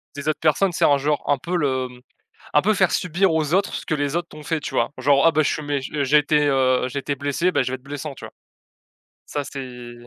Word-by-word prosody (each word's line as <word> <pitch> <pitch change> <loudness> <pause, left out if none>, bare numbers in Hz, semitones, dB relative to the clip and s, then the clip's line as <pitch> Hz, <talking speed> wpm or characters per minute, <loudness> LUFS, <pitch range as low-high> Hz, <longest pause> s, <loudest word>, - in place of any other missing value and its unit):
des 145 +1 -6
autres 155 - -1
personnes, 170 +5 +3
tu - - -6
sais, - - +4
en, 145 - +5
genre, 145 +2 -1
un 145 - +3
peu 175 +7 -4
le 130 -5 0 0.7
un 150 - +5
peu 215 - +3
faire 185 -2 +2
subir 180 +1 +1
aux 155 0 0
autres 195 +1 +1
ce - - -5
que - - 0
les 145 +1 -2
autres 170 0 -2
t'ont 150 0 -11
fait, 160 0 -1
tu - - -6
vois? 120 - +1
Genre: 140 +3 +4
«Ah, 165 - +5
bah, 155 -1 +3
je - - +1
suis 155 - -4
méch 145 -2 -3
j'ai 150 0 +3
été, 150 0 +2
heu, 130 -2 +2
j'ai 140 +2 -4
été 140 +1 -2
blessé, 145 +6 0
beh, - - +2
je 130 - -3
vais - - -1
être 130 - -25
blessant», 145 +1 -6
tu - - -10
vois, - - -10 0.9
ça, 145 - -3
c'est 125 -3 -8
145 Hz, 270 wpm, -22 LUFS, 135-160 Hz, 0.9 s, en